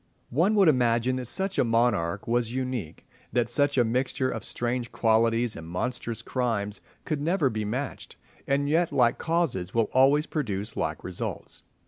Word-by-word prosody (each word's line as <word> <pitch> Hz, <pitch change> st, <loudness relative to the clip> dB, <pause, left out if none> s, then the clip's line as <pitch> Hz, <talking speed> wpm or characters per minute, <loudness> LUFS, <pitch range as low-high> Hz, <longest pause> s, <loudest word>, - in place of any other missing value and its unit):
One 175 Hz, -, +2 dB
would 195 Hz, -4 st, +5 dB
imagine 125 Hz, -2 st, +3 dB
that 125 Hz, -2 st, -4 dB
such 190 Hz, -, 0 dB
a -, -, +5 dB
monarch 115 Hz, -7 st, +1 dB
was 120 Hz, 0 st, 0 dB
unique, 130 Hz, -10 st, -4 dB, 0.3 s
that 120 Hz, -1 st, +1 dB
such 145 Hz, +2 st, +2 dB
a 125 Hz, -, +6 dB
mixture 130 Hz, +2 st, 0 dB
of -, -, -5 dB
strange 120 Hz, 0 st, -2 dB
qualities 115 Hz, +1 st, +2 dB
and 80 Hz, 0 st, -8 dB
monstrous 115 Hz, +5 st, -3 dB
crimes 110 Hz, -6 st, -2 dB, 0.2 s
could 150 Hz, -3 st, -2 dB
never 160 Hz, -3 st, +1 dB
be 110 Hz, -1 st, -3 dB
matched, 130 Hz, +6 st, -4 dB, 0.3 s
and 140 Hz, +1 st, +1 dB
yet 165 Hz, +3 st, +2 dB
like 120 Hz, -2 st, +3 dB
causes 155 Hz, -, -1 dB
will 115 Hz, -2 st, +1 dB
always 140 Hz, +4 st, +4 dB
produce 105 Hz, -, -3 dB
like -, -, -3 dB
results. 90 Hz, -1 st, -5 dB
120 Hz, 160 wpm, -27 LUFS, 115-140 Hz, 0.3 s, a